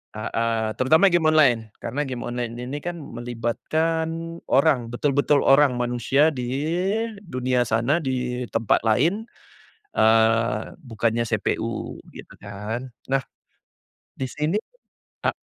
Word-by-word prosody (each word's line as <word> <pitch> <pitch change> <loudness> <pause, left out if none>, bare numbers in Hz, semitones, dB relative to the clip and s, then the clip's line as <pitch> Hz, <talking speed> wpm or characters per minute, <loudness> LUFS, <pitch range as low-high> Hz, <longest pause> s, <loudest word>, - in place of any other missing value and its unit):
heeh, 115 0 -1
terutama 160 +9 +5
game 175 -2 +2
online 125 -8 +4
karena 135 +6 -2
game 125 -2 -5
online 120 -1 -3
ini 125 +4 -5
kan 175 0 -4
melibatkan 160 +8 -2
orang, 135 -5 +3
betul-betul 145 +2 +2
orang 135 -1 +5
manusia 125 +5 +2
di 125 -1 -3 0.7
dunia 125 -4 0
sana 115 +7 +2
di 125 -1 -2
tempat 115 -3 +2
lain, 165 - +2 0.7
eee, 110 0 +3
bukannya 115 -2 -1
CPU - - -2 0.2
gitu - - -11
kan 105 +5 -5 0.2
nah, 135 0 +2 0.9
di 130 - -3
sini 150 +9 -1 0.7
a - - +2
125 Hz, 115 wpm, -24 LUFS, 115-150 Hz, 0.9 s, terutama